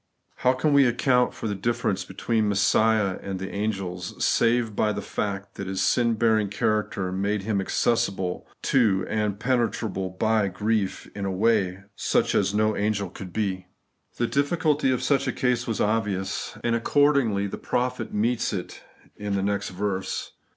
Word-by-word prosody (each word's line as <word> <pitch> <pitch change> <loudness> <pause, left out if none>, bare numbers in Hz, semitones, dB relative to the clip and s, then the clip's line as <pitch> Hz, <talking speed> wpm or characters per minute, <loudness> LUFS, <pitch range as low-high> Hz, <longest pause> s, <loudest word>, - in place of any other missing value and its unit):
How 125 - +3
can 135 +3 +1
we 140 -2 +6
account 125 +1 +2
for - - -5
the 105 - -1
difference 105 -1 -1
between 110 +3 0
Messiah 105 0 +2
and 95 -1 -4
the 95 +1 -5
angels, 95 -4 -3
save 115 -2 +2
by 105 - +2
the 100 - -3
fact 100 -1 -4
that 100 - -5
His 95 0 -3
sin 115 -2 +2
bearing 110 -2 +2
character 105 -2 -1
made 100 +2 -1
Him 100 -2 0
accessible 95 -4 0 0.2
to 105 -8 +3
and 105 -2 -1
penetrable 110 -5 0
by 110 +2 +1
grief, 105 +1 -1
in 100 - -5
a 95 - -1
way 95 -2 +1
such - - +1
as 100 0 +2
no 110 +1 +1
angel 100 -2 -1
could 95 -2 -9
be? 95 -2 -2 0.5
The 120 - +1
difiiculty 145 0 +1
of 130 - -1
such 140 -2 +2
a - - +2
case 125 -1 0
was 115 - -2
obvious; 105 -3 -1
and 120 -1 +1
accordingly 125 -5 +2
the 100 - -5
prophet 125 -2 -2
meets 115 +3 0
it 90 -3 -5 0.3
in 105 -1 -3
the 95 - 0
next 100 0 -1
verse. 95 0 -3
105 Hz, 165 wpm, -25 LUFS, 95-115 Hz, 0.5 s, we